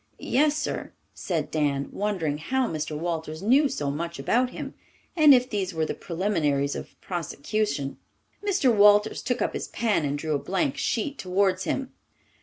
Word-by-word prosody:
"Yes, 295 +3 +2
sir," 305 - -3 0.2
said - - -3
Dan, 145 -3 0
wondering 180 -8 -1
how 260 +10 0
Mr. 155 -3 -3
Walters 160 0 -4
knew 270 +7 +4
so 145 - -2
much 170 +3 -4
about 245 - +1
him, - - -7 0.4
and 310 -4 +7
if 250 -2 +6
these 195 -6 -3
were 160 -1 +1
the - - -2
preliminaries 165 -7 0
of - - -8
prosecution. 165 -3 -2 0.4
Mr. 370 - +2
Walters 210 +1 +5
took 250 - -1
up - - -1
his - - -4
pen 215 -8 0
and 145 0 -1
drew 155 +1 -2
a 145 - +1
blank 265 - -1
sheet 280 0 -2
towards 185 0 +1
him. 270 -1 -2
190 Hz, 165 wpm, -26 LUFS, 155-245 Hz, 0.4 s, and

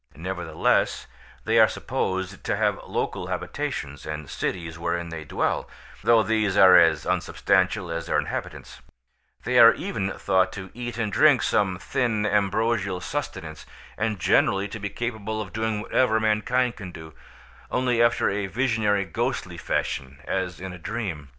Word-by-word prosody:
Nevertheless 85 -1 0 0.4
they - - +3
are - - +8
supposed 95 -1 -3
to - - 0
have - - +1
local - - -3
habitations 70 -1 -4
and 75 -2 -6
cities 85 -3 -4
wherein 85 0 -2
they 80 -1 -6
dwell, 75 - -1 0.3
though 115 -2 +5
these 110 -3 +1
are 95 -1 +8
as 80 -4 +5
unsubstantial 95 -1 +1
as 85 0 -4
their - - +1
inhabitants; - - -5 0.6
they - - +2
are - - +9
even 95 0 -3
thought 95 -1 +1
to 95 -2 -8
eat 120 0 -6
and 110 -4 -2
drink - - +5
some 95 -3 +1
thin 110 +2 -1
ambrosial 100 -1 +1
sustenance, 90 - -5 0.3
and 110 -1 -1
generally 95 +3 +2
to 115 - -7
be 100 0 -3
capable 110 -1 -4
of 100 -3 -6
doing 110 -1 -1
whatever 110 0 +2
mankind 115 +3 +1
can 95 -4 -8
do, 80 -2 -11 0.6
only 125 -2 +1
after 120 0 +3
a 100 0 -1
visionary 105 -3 +1
ghostly 85 - -3
fashion 70 0 -2
as 95 -1 -2
in 95 0 -6
a 90 - -10
dream. 90 -8 -5
100 Hz, 150 wpm, -25 LUFS, 85-110 Hz, 0.6 s, are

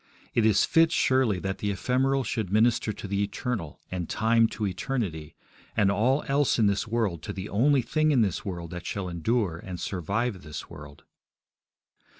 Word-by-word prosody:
It 115 -2 +3
is 105 - +4
fit, 165 0 +4
surely, 130 - +2
that 95 0 -3
the 105 - -1
ephemeral 130 +6 +1
should 110 -5 -3
minister 110 +1 +3
to 100 - -7
the 100 +1 -1
eternal, 100 - -3
and 90 -3 -4
time 115 +1 +3
to 110 - -4
eternity, 90 - -3 0.4
and 100 -2 +4
all 125 +8 +2
else 140 0 +2
in 110 - +3
this 100 +2 +1
world 110 -8 -1
to - - -5
the 95 +1 -5
only 130 +5 +3
thing 155 +6 +1
in 135 -5 +4
this 100 -5 0
world 85 -4 -5
that 90 -1 -6
shall 100 -2 -3
endure 90 +1 -1
and 90 -1 -7
survive 100 +5 -2
this 75 -3 -8
world. 75 -1 -11
105 Hz, 175 wpm, -27 LUFS, 90-125 Hz, 0.4 s, is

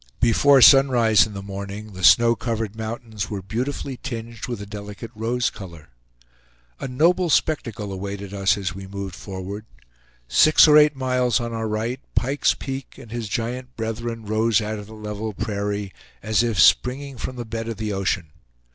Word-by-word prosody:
Before 130 +3 +5
sunrise 120 -6 +6
in 105 - -10
the 100 - -6
morning 100 +2 -7
the 90 0 -8
snow 120 +4 +6
covered 110 -3 -3
mountains 110 -2 -5
were 100 -3 -5
beautifully 125 +6 -4
tinged 115 -3 -6
with 120 -4 -4
a 100 - -7
delicate 105 +2 -8
rose 115 +2 -1
color. 85 -7 -11 0.9
A - - -4
noble 170 +7 +2
spectacle 115 -11 0
awaited 100 +1 -6
us 100 0 +2
as 95 -5 -3
we 95 0 -9
moved 100 -1 -6
forward. 100 +3 -7 0.6
Six 155 - +6
or 150 - +6
eight 150 -1 +6
miles 125 -3 +1
on 120 -1 -4
our 110 -1 -2
right, 110 +4 -2 0.2
Pike's 135 +3 +1
Peak 135 -1 -7
and 120 -5 -13
his 115 -3 -4
giant 125 +4 -4
brethren 115 0 -4
rose 110 +1 +2
out 110 0 -4
of 105 - -10
the 110 - -11
level 105 0 -5
prairie, 100 -1 -3 0.3
as 110 +2 +2
if 115 -6 -1
springing 130 - +3
from 130 - -5
the 120 -1 -6
bed 115 0 -5
of 115 -2 -4
the 110 -1 -3
ocean. 95 -4 -2
110 Hz, 175 wpm, -23 LUFS, 100-125 Hz, 0.9 s, sunrise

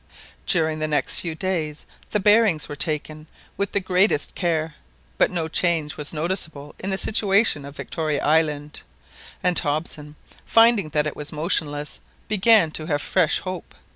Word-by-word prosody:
During 160 -2 +2
the 155 - 0
next 150 -1 -1
few 165 -3 -2
days 160 -5 -3 0.2
the 210 - 0
bearings 205 -5 +3
were 145 - -6
taken 155 0 -2 0.3
with 200 +1 -1
the 200 - +1
greatest 185 -4 +2
care, 160 -3 -1 0.5
but - - +5
no 170 -3 -2
change 160 -2 0
was 150 0 -4
noticeable 155 -3 -4
in 190 - -4
the 190 - 0
situation 200 -7 +2
of 140 +1 -10
Victoria 155 -3 -3
Island; 150 -1 0 0.6
and 180 -1 +3
Hobson, 150 -1 -3 0.3
finding 225 -7 +4
that 150 -1 0
it 150 - -4
was 150 0 -3
motionless, 150 -2 -1 0.3
began 210 -4 +4
to 155 0 -1
have 145 -2 0
fresh 180 -5 +2
hope. 185 -2 -7
160 Hz, 155 wpm, -23 LUFS, 150-185 Hz, 0.6 s, but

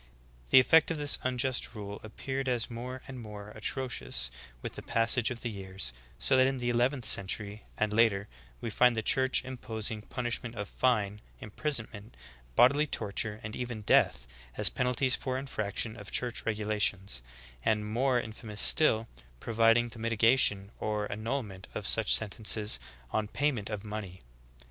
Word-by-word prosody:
"^ - - -24
The - - +9
effect 160 +5 +5
of 165 - -2
this 145 -1 +3
unjust 130 0 -1
rule 100 -1 -7
ap 110 - -12
peared 135 0 -3
as 120 -2 -1
more 125 +2 -6
and 130 -2 -8
more 105 -1 -9
atrocious 105 - -1 0.3
with - - -5
the - - -8
passage 115 +1 +1
of 120 -2 -6
the 120 - -2
years, 95 - -3 0.2
so 135 - +2
that 130 0 +5
in 135 0 -1
the 120 -1 -1
eleventh 125 +2 +1
century, 100 +2 +1
and 105 -1 0
later, 105 -3 +3 0.3
we 115 - -4
find 125 +2 +4
the 110 - -1
Church 130 +3 +3
imposing 110 -4 -3
punishment 120 0 -4
of 100 -1 -4
fine, 105 -5 0 0.2
imprisonment, 115 -2 -4 0.4
bodily 140 - +5
torture, 105 -2 -3
and 105 +1 -6
even 120 -3 -5
death, - - +3 0.3
as - - +6
penalties 125 +1 +1
for 130 -1 -3
infraction 110 -4 -3
of 105 - -9
church 120 -2 -1
regulations, 105 - -1 0.4
and, 105 -1 +1
more 125 +3 +1
infamous 110 -2 -7
still, 115 -8 +5 0.3
providing 115 - +3
for 115 -1 -11
mitiga 115 +2 +3
tion 100 -5 +2
or 105 -1 -1
annulment 110 -3 -4
of 105 - -4
such 110 0 +4
sentences 105 - +2 0.3
on 110 -1 -1
payment 125 -4 -1
of 105 -2 -5
mon 105 -1 -5
ey. 95 0 -13
115 Hz, 165 wpm, -30 LUFS, 105-125 Hz, 0.4 s, The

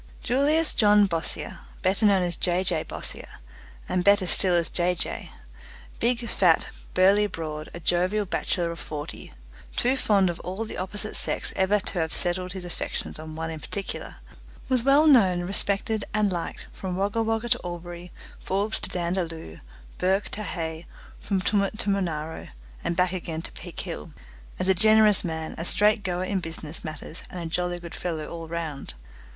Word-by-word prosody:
Julius 295 +6 +2
John 210 -1 +5
Bossier, 165 -4 -2 0.2
better 195 +3 +3
known 195 -2 +4
as 175 -1 -1
J. 180 +1 +1
J. 175 -4 +2
Bossier, - - -4 0.5
and 180 - 0
better 200 -1 +5
still 180 0 +9
as 170 -1 +1
Jay 180 0 +1
Jay - - -3 0.7
big, 235 0 0
fat, 175 -7 +3 0.3
burly, 200 +3 +5
broad, 155 -4 -6
a - - -6
jovial 180 +5 +1
bachelor 175 -2 -1
of 170 - -7
forty, 150 -1 -7 0.4
too 250 +2 +2
fond 205 -7 +3
of 170 - -9
all 190 +5 -4
the - - -7
opposite 205 +3 -4
sex - - 0
ever 195 +2 +3
to 195 -2 -3
have 160 -1 -1
settled 180 +1 +1
his 190 -2 -6
affections 175 - -4
on 155 0 -8
one 165 0 -3
in 160 - -6
particular 195 +5 -4 0.5
was 255 -2 +2
well 275 +5 +5
known, 195 - +5
respected, 200 +3 0
and 210 -2 +2
liked 170 -2 -4
from 185 -2 -5
Wagga 200 +4 0
Wagga 225 +1 -1
to 245 0 +3
Albury, 175 0 -7 0.3
Forbes 200 +3 -1
to - - -1
Dandaloo, 170 - -3 0.4
Bourke 190 +2 +1
to 210 - -4
Hay, 165 -4 -4 0.3
from 195 -2 -1
Tumut 200 +1 +1
to 205 - 0
Monaro, 160 -5 -2 0.4
and 170 - -1
back 180 +1 +2
again 165 -3 -4
to - - -6
Peak - - -7
Hill, 75 - -7 0.4
as 185 - 0
a 190 - +6
generous 215 +1 +6
man, 160 -2 -4
a - - -2
straight 210 +5 +3
goer 180 -2 -2
in 190 +1 -1
business 160 -2 -5
matters, 155 +1 -6
and 180 - -7
a 170 - -4
jolly 175 +2 -1
good 170 0 -9
fellow 160 -4 -3
all 165 -1 -7
round. 160 - -5
185 Hz, 175 wpm, -26 LUFS, 170-205 Hz, 0.7 s, still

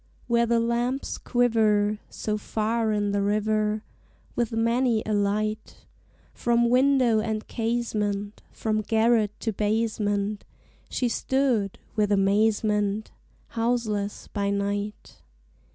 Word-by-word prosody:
Where 235 -1 +2
the 235 0 +3
lamps 240 +3 -1
quiver 215 -4 +2
So 215 - -3
far 220 +1 -1
in 205 -1 0
the 200 0 0
river, 215 +1 0 0.5
With 235 -1 0
many 230 0 +1
a 215 - -1
light 215 +1 -1 0.5
From 235 0 +2
window 255 -3 +4
and 215 0 -3
casement, 215 -3 -2
From 215 -1 -1
garret 220 -1 +2
to 225 - -1
basement, 210 -1 -1 0.5
She 250 - 0
stood, 240 -5 0 0.2
with 210 -2 +1
amazement, 210 +1 +1 0.4
Houseless 225 -3 -1
by 200 -1 -2
night. 200 +1 -3
215 Hz, 105 wpm, -26 LUFS, 205-235 Hz, 0.5 s, window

